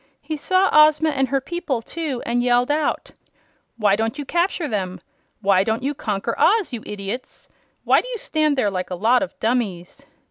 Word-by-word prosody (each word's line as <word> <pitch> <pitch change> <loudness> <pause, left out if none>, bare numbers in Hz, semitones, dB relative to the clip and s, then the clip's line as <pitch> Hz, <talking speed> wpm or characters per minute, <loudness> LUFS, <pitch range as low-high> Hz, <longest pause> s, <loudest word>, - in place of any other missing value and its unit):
He 315 - -4
saw 370 +6 +2
Ozma 305 +1 +5
and 270 -2 0
her 275 +2 0
people, 275 -4 -3
too, 305 -5 -4
and 240 +1 0
yelled 245 +2 +2
out: 300 +1 -1 0.7
"Why 205 -3 +3
don't 225 +5 -2
you 290 - -5
capture 345 +1 0
them? 190 -6 -3 0.4
Why 195 -2 +3
don't 220 +3 -2
you 280 +2 -1
conquer 215 -3 -3
Oz, 405 - +3
you 235 - -4
idiots? 205 +5 -7 0.3
Why - - +4
do - - -11
you - - -4
stand 310 -7 0
there 210 -6 +1
like 185 -1 -3
a 180 - -3
lot 230 +7 +3
of 285 - -5
dummies?" 215 -7 -2
250 Hz, 185 wpm, -21 LUFS, 215-305 Hz, 0.7 s, Ozma